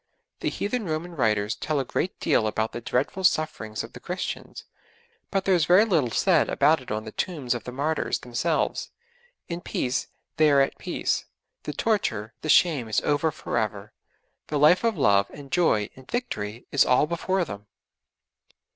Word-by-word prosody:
The - - -1
heathen 220 +2 -2
Roman 165 +1 -3
writers 105 -5 +1
tell 150 +6 -2
a 135 - -1
great 185 - -2
deal 135 -9 +2
about 110 +1 -1
the 120 - -6
dreadful 125 +11 -1
sufferings 155 -11 0
of 115 - -10
the - - -9
Christians, 180 +1 -5 0.7
but 195 -2 -1
there 195 - +4
is 170 -4 +3
very 180 +6 +6
little 160 - +2
said - - +3
about 155 -2 +3
it 130 - -12
on 110 +1 -2
the 110 - -8
tombs 145 -7 -2
of 120 -3 -6
the 125 - -5
martyrs 150 +5 -1
themselves. 150 +7 -1 0.6
In 170 0 -4
peace; 130 -6 -2 0.3
they 155 0 +5
are 140 -1 +5
at 135 - -1
peace: - - -1 0.4
the 150 - -3
torture, 125 - -1
the 155 - -5
shame 150 -8 +4
is 110 - +1
over 145 +2 +1
for - - -3
ever; 105 -1 -4 0.5
the 150 - -1
life 155 +7 +5
of 230 -4 +1
love 100 -8 +3
and 140 -2 -12
joy 160 - +2
and 130 0 -16
victory 115 - -4
is 140 - +5
all 125 +3 +4
before 175 +3 -1
them. 105 -6 -8
145 Hz, 180 wpm, -25 LUFS, 115-170 Hz, 0.7 s, very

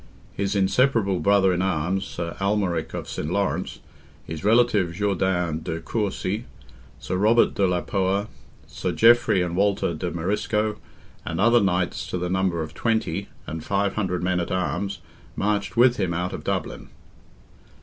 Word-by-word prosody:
His 100 +1 -2
inseparable 100 -1 +2
brother 100 -2 +4
in 90 - 0
arms, 95 +1 0
Sir 85 -1 -5
Almaric 95 -5 0
of - - -5
St. 75 - -4
Laurence, 100 +1 -1 0.4
his 80 +1 -6
relative, 105 -5 +3
Jourdain 90 -5 0
de 80 -1 -4
Courcy, 105 +2 -2 0.5
Sir 90 - -3
Robert 110 +4 +4
de 100 - +2
la 90 -1 0
Poer, 100 +1 0 0.4
Sir - - -4
Geoffrey 115 -5 +5
and 85 -1 -3
Walter 100 -2 +1
de 85 +3 -3
Marisco, 105 +5 -1 0.5
and 80 - -4
other 120 +3 +5
Knights 90 -1 0
to 90 - -3
the 90 0 -3
number 95 -3 0
of 75 0 -8
twenty, 100 -3 -1 0.2
and 80 0 -6
five 100 0 0
hundred 90 -4 -2
men 90 0 +1
at 85 - -3
arms, 95 0 -2 0.3
marched 100 -2 -1
with 120 +1 +5
him 85 -2 -1
out 90 +1 -2
of - - -6
Dublin. - - -3
95 Hz, 155 wpm, -24 LUFS, 90-105 Hz, 0.5 s, Geoffrey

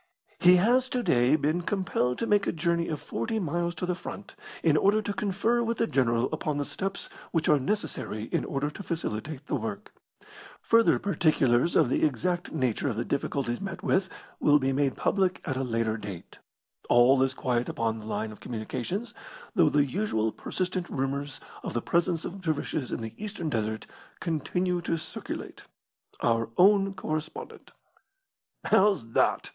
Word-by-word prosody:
He 180 +1 +7
has 245 +8 +3
to 250 -1 -1
day 125 - +4
been 155 +3 +1
compelled 175 -10 0
to - - -1
make 205 -2 +2
a - - +2
journey 170 +1 0
of 155 -3 -3
forty 115 - -3
miles 175 -2 -1
to 175 - -3
the 180 - 0
front, 185 +3 -8 0.3
in 160 -3 +4
order 200 +7 +4
to 205 -1 -3
confer 220 +2 +1
with 230 -1 -1
the 230 - +2
general 120 - +2
upon 150 -2 -1
the 145 - -1
steps 195 +5 -4 0.2
which 165 -2 0
are 150 - +5
necessary 130 - -2
in - - +1
order 145 +1 -2
to 150 - -8
facilitate 155 - -4
the - - -5
work. 110 -6 -4 0.7
Further 230 0 +4
particulars 155 -7 +2
of - - +5
the 125 - 0
exact 165 +5 0
nature 130 -3 0
of 115 - -2
the 115 +2 -2
difficulties 135 -3 -2
met 195 -1 -5
with 190 0 +2 0.3
will 145 0 +5
be 135 -1 0
made 135 -1 +1
public 190 -2 +1
at 135 -7 -2
a 130 - -1
later 115 -2 0
date. 100 -5 -9 0.5
All 125 +2 +6
is 130 0 +1
quiet 125 -2 0
upon 115 -1 -1
the 110 - -9
line 110 0 -2
of 105 - -12
communications, 125 - -4 0.4
though 170 -8 +5
the 145 -1 +3
usual 130 - 0
persistent 185 - -3
rumours 140 +1 -2 0.2
of - - -5
the - - +2
presence 170 -1 +1
of 195 +2 -6
dervishes 155 -4 -2
in - - -3
the 110 0 -6
Eastern 175 -7 -4
desert 110 -2 -2 0.3
continue 180 +2 -1
to 165 -1 -1
circulate. 160 - -7 0.6
Our 115 -1 +1
own 195 +1 +5
correspondent. 155 -4 -5 0.9
"How's 190 - +3
that?" - - +2
155 Hz, 170 wpm, -28 LUFS, 125-185 Hz, 0.9 s, He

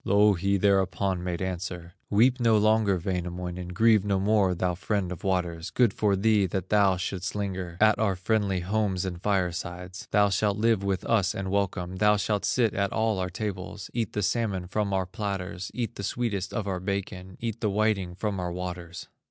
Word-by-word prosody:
Louhi 100 -1 +3
thereupon 95 -1 +1
made 90 0 -2
answer: 90 -2 -5 0.2
"Weep 125 +5 +4
no 115 -2 +4
longer, 110 -2 +3
Wainamoinen, 90 0 -4
Grieve 110 +3 +4
no 100 -2 +1
more, 100 -2 +2
thou 90 +1 0
friend 95 0 -2
of 90 - -7
waters, 90 -2 -1
Good 120 -3 +2
for 105 -2 +2
thee, 105 0 +3
that 95 +1 -3
thou 100 -3 +4
shouldst 90 +1 -3
linger 95 -4 -4
At 110 0 +4
our 105 -3 +2
friendly 100 -1 0
homes 95 -1 0
and 90 -2 -5
firesides; 90 -2 -2
Thou 105 0 +4
shalt 100 +1 +1
live 110 -2 +2
with 100 -2 -1
us 100 -5 +2
and 95 -1 -3
welcome, 95 -2 -1
Thou 105 +2 +4
shalt 105 0 -1
sit 115 -5 +2
at 100 0 0
all 110 -3 0
our 90 0 -1
tables, 95 0 -5
Eat 115 -3 -2
the 105 - -1
salmon 100 -4 0
from 100 +2 -1
our 95 -1 +1
platters, 95 -1 -4
Eat 120 -2 -3
the 100 - -7
sweetest 100 -3 -2
of 110 -3 -3
our 95 -2 -2
bacon, 95 -1 -4
Eat 115 -1 -4
the 110 - +1
whiting 100 -3 0
from 100 0 -2
our 90 -1 -2
waters." 90 -1 -6
95 Hz, 185 wpm, -27 LUFS, 90-105 Hz, 0.2 s, Weep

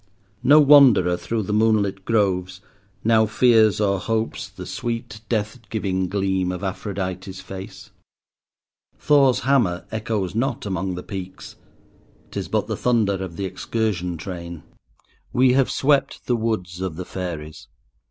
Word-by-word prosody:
No 150 +3 +6
wanderer 135 - +6
through 105 +6 -3
the 105 - -3
moonlit 105 -3 +1
groves 95 -4 0 0.4
now 110 0 +4
fears 110 -2 +4
or 100 -2 +1
hopes 110 +2 -2
the - - -10
sweet, 115 -3 -5
death 110 +1 -1
giving 95 -4 -1
gleam 95 -2 0
of 90 +1 -6
Aphrodite's 95 -1 -4
face. 95 +2 -9 1.1
Thor's 140 -4 +3
hammer 120 -11 +1
echoes 110 -4 -2
not 125 +3 -1
among 95 -1 -2
the 90 - -6
peaks—'tis 95 -2 -10
but - - 0
the - - -3
thunder 105 -6 +1
of 90 -3 -7
the 100 - -3
excursion 95 -2 -2
train. 85 -2 -7 0.7
We 125 0 +4
have 135 0 +3
swept 140 0 +1
the 125 - +1
woods 95 -6 -3
of 95 -4 -3
the 90 +2 -6
fairies. 80 -5 -6
100 Hz, 135 wpm, -22 LUFS, 95-115 Hz, 1.1 s, No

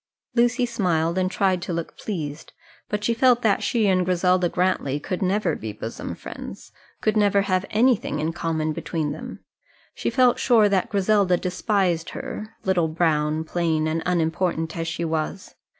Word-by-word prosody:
Lucy 240 +1 +3
smiled, 175 -8 0
and 185 0 +1
tried 190 -2 +1
to 175 - -4
look 170 -1 -4
pleased, 160 -7 -5 0.4
but 210 0 -2
she 235 - +2
felt 245 +1 +3
that 210 -3 +3
she 235 -4 +1
and 185 -2 +3
Griselda 180 0 +2
Grantly 175 -7 0
could 180 +4 -4
never 195 +3 +1
be 110 0 -5
bosom 110 +2 -6
friends - - -9 0.3
could 215 0 +1
never 205 -2 +3
have 185 -1 0
anything 235 +1 +2
in 160 +2 -1
common 160 -2 -1
between 160 -2 -3
them. - - -8 0.5
She - - -2
felt 250 -2 +3
sure 225 -4 +5
that 195 -2 +1
Griselda 200 -2 +3
despised 180 -2 0
her, 215 +1 -7
little, 180 -4 +2
brown, 155 -1 +1
plain, 160 -1 0
and 160 +1 -1
unimportant 165 -1 0
as 165 -1 -3
she 165 +1 -2
was. 160 +4 -3
180 Hz, 165 wpm, -24 LUFS, 165-205 Hz, 0.5 s, sure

